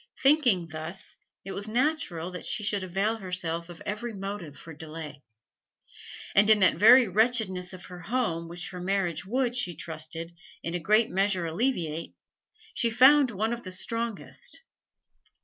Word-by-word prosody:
Thinking 250 Hz, -, +4 dB
thus, 160 Hz, +4 st, -6 dB, 0.3 s
it 195 Hz, -, -5 dB
was 205 Hz, +2 st, -3 dB
natural 225 Hz, -, -1 dB
that 180 Hz, -, -7 dB
she 215 Hz, -, -1 dB
should 205 Hz, -1 st, +1 dB
avail 195 Hz, +5 st, -1 dB
herself 175 Hz, -4 st, -3 dB
of 175 Hz, -, -10 dB
every 215 Hz, +2 st, -4 dB
motive 195 Hz, -6 st, -6 dB
for 165 Hz, -, -10 dB
delay. 155 Hz, -2 st, -8 dB, 1.1 s
And 205 Hz, +2 st, +5 dB
in 215 Hz, -, +7 dB
that 185 Hz, -, +4 dB
very 235 Hz, +5 st, +8 dB
wretchedness 200 Hz, -3 st, +1 dB
of 185 Hz, -1 st, -9 dB
her 180 Hz, -1 st, -10 dB
home 175 Hz, -5 st, -1 dB
which 175 Hz, +1 st, -4 dB
her 180 Hz, -1 st, -7 dB
marriage 180 Hz, -3 st, -1 dB
would, 245 Hz, +2 st, 0 dB
she 180 Hz, -9 st, -1 dB
trusted, 160 Hz, +1 st, -6 dB, 0.3 s
in 165 Hz, -, -3 dB
a 175 Hz, -, -1 dB
great 215 Hz, +6 st, +3 dB
measure 190 Hz, -2 st, +1 dB
alleviate, 165 Hz, -, -1 dB, 0.6 s
she 235 Hz, -, +1 dB
found 260 Hz, +4 st, +6 dB
one 220 Hz, +1 st, -1 dB
of 240 Hz, -, -5 dB
the 185 Hz, -, -7 dB
strongest. 230 Hz, -, -2 dB
190 Hz, 155 wpm, -28 LUFS, 170-225 Hz, 1.1 s, very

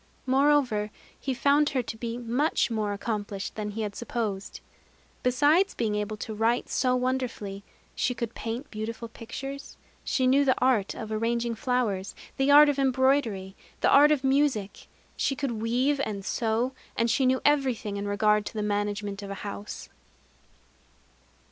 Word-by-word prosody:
Moreover, 260 Hz, -5 st, +3 dB, 0.3 s
he 270 Hz, -, -3 dB
found 285 Hz, +3 st, +3 dB
her 260 Hz, -3 st, -1 dB
to 225 Hz, -, -6 dB
be 230 Hz, +1 st, -4 dB
much 245 Hz, +3 st, 0 dB
more 215 Hz, -2 st, -1 dB
accomplished 205 Hz, -1 st, -4 dB
than 210 Hz, -1 st, -4 dB
he 220 Hz, +2 st, -4 dB
had 205 Hz, -2 st, -4 dB
supposed. 215 Hz, -5 st, -4 dB, 0.6 s
Besides 295 Hz, +9 st, +3 dB
being 220 Hz, -3 st, -1 dB
able 210 Hz, +1 st, -2 dB
to 220 Hz, -, -5 dB
write 225 Hz, +3 st, +1 dB
so 255 Hz, -1 st, +1 dB
wonderfully, 250 Hz, -6 st, -2 dB, 0.3 s
she 250 Hz, -, -1 dB
could 235 Hz, -1 st, -4 dB
paint 235 Hz, +5 st, -5 dB
beautiful 225 Hz, +2 st, -5 dB
pictures; 270 Hz, +5 st, -8 dB, 0.3 s
she 260 Hz, -, 0 dB
knew 270 Hz, +3 st, +5 dB
the 260 Hz, -2 st, +2 dB
art 245 Hz, -6 st, +2 dB
of 220 Hz, -1 st, -6 dB
arranging 235 Hz, +2 st, 0 dB
flowers, 220 Hz, -5 st, -1 dB, 0.2 s
the 270 Hz, +1 st, +2 dB
art 295 Hz, +1 st, +9 dB
of 285 Hz, -1 st, +1 dB
embroidery, 260 Hz, -7 st, +1 dB, 0.3 s
the -, -, +4 dB
art 295 Hz, +2 st, +7 dB
of 285 Hz, -3 st, +1 dB
music; 265 Hz, -7 st, 0 dB, 0.3 s
she 275 Hz, -, 0 dB
could 260 Hz, -6 st, -3 dB
weave 255 Hz, +5 st, +1 dB
and 200 Hz, -2 st, -4 dB
sew; 230 Hz, +3 st, 0 dB, 0.3 s
and 230 Hz, 0 st, +2 dB
she 260 Hz, +2 st, +2 dB
knew 260 Hz, 0 st, +3 dB
everything 260 Hz, -8 st, +1 dB
in 200 Hz, 0 st, -3 dB
regard 210 Hz, +1 st, +2 dB
to -, -, -6 dB
the 210 Hz, -, -1 dB
management 205 Hz, 0 st, -2 dB
of 200 Hz, -, -7 dB
a 200 Hz, -, -4 dB
house. 205 Hz, 0 st, -6 dB
235 Hz, 160 wpm, -27 LUFS, 210-265 Hz, 0.6 s, art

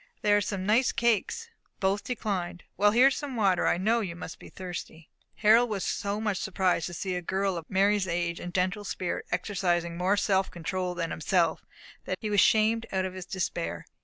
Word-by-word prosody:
There 205 Hz, -1 st, +5 dB
are 205 Hz, -, +3 dB
some 190 Hz, -1 st, -3 dB
nice 225 Hz, +5 st, +3 dB
cakes." 235 Hz, -, 0 dB, 0.3 s
Both 195 Hz, +1 st, +1 dB
declined. 190 Hz, -8 st, -3 dB
"Well, 205 Hz, +2 st, +4 dB
here 245 Hz, +5 st, +6 dB
is 265 Hz, -, -3 dB
some 285 Hz, -4 st, -5 dB
water. 195 Hz, -5 st, +2 dB
I -, -, +3 dB
know 220 Hz, +6 st, +2 dB
you 185 Hz, -6 st, -4 dB
must 175 Hz, -, -8 dB
be -, -, -12 dB
thirsty." 175 Hz, -3 st, -8 dB, 0.2 s
Harold 225 Hz, +3 st, +5 dB
was 200 Hz, -3 st, -2 dB
so 205 Hz, +1 st, -2 dB
much 210 Hz, -3 st, -1 dB
surprised 185 Hz, -4 st, 0 dB
to 175 Hz, -, -7 dB
see 185 Hz, +2 st, -3 dB
a 180 Hz, -, -2 dB
girl 190 Hz, +2 st, -1 dB
of 165 Hz, -2 st, -7 dB
Mary's 200 Hz, 0 st, +2 dB
age 170 Hz, 0 st, -1 dB
and 175 Hz, -, -6 dB
gentle 185 Hz, +3 st, 0 dB
spirit 185 Hz, -3 st, -3 dB
exercising 175 Hz, -2 st, 0 dB
more 185 Hz, +3 st, +2 dB
self 195 Hz, -2 st, +2 dB
control 180 Hz, +1 st, -3 dB
than 170 Hz, -2 st, -2 dB
himself, 165 Hz, 0 st, +1 dB, 0.4 s
that -, -, -2 dB
he 215 Hz, -2 st, -3 dB
was 205 Hz, -, +3 dB
shamed 225 Hz, +1 st, +3 dB
out 190 Hz, -1 st, 0 dB
of 185 Hz, -, -4 dB
his 185 Hz, -1 st, -8 dB
despair. 180 Hz, -3 st, -3 dB
190 Hz, 200 wpm, -28 LUFS, 180-210 Hz, 0.4 s, here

